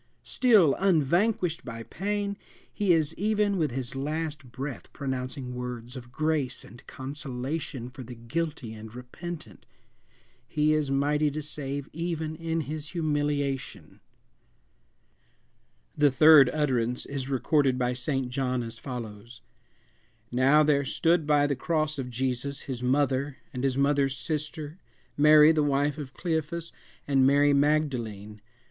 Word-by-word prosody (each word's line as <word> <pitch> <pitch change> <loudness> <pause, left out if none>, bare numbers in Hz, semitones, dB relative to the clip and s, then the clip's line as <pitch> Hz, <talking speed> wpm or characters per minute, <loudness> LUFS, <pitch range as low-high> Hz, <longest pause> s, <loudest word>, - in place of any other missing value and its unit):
Still 210 - +4
unvanquished 175 0 +2
by 115 -2 -7
pain, 200 - -2 0.4
he 205 -3 +1
is 160 -2 +2
even 210 0 +1
with 155 -2 +1
his 125 +1 -4
last 145 -1 -3
breath 135 +1 -6
pronouncing 130 -2 -4
words 125 0 -6
of 120 -2 -9
grace 155 -3 -1
and 120 - -14
consolation 135 -1 -5
for 130 +2 -10
the 125 0 -9
guilty 125 0 -4
and 110 +1 -10
repentant! 155 +7 -8 0.8
He 150 +4 +2
is 155 -2 0
mighty 145 +2 +2
to 150 +1 -5
save 140 -1 -5
even 160 -1 -3
in 165 0 -2
his 150 0 -5
humiliation! 145 -5 -2 2.0
The 145 -1 +4
third 145 0 +7
utterance 125 -5 0
is 135 -1 -4
recorded 135 0 +2
by 125 0 0
St. 130 +1 -2
John 130 -1 -1
as 115 -1 -7
follows: 120 -2 -8 0.9
"Now 135 +5 +5
there 145 -2 +3
stood 165 +3 +1
by 145 -1 +4
the 145 -1 0
cross 155 +1 -1
of 125 -2 -4
Jesus 130 +3 -3
his 130 -3 -5
mother, 135 +1 +1 0.2
and 125 -1 -4
his 135 -1 +1
mother's 140 -1 +2
sister, 150 +3 -4 0.4
Mary 150 +1 +7
the 155 -1 +2
wife 145 +1 +1
of 135 -3 -8
Cleophas, 165 0 -2 0.4
and 135 -2 +4
Mary 145 +1 +4
Magdalene. 125 -9 0
140 Hz, 130 wpm, -27 LUFS, 125-155 Hz, 2.0 s, third